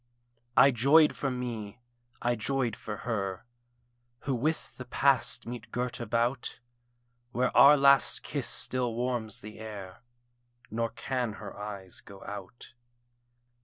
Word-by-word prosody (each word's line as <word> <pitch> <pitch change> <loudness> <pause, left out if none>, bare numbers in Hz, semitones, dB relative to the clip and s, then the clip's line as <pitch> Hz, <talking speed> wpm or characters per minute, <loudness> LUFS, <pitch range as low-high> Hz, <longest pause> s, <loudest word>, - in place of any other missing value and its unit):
I 140 - +8
joyed 140 +6 +5
for 135 - -1
me, 120 -5 -5 0.4
I 120 0 +2
joyed 120 0 -1
for 105 -1 -6
her, 100 -6 -2 0.8
Who 135 - -1
with 150 +6 -1
the 130 - -7
Past 135 +1 +2
meet 120 -1 -7
girt 125 +1 -2
about: 120 +2 -1 0.7
Where 125 +1 0
our 145 +2 +9
last 140 -1 +4
kiss - - -3
still 125 -3 -2
warms 120 -3 -2
the 105 +1 -10
air, 100 -4 -8 0.7
Nor 115 +1 0
can 120 0 -2
her 105 0 -9
eyes 100 -3 -7
go 100 -1 -12
out. 100 +4 -9
120 Hz, 130 wpm, -29 LUFS, 105-130 Hz, 0.8 s, our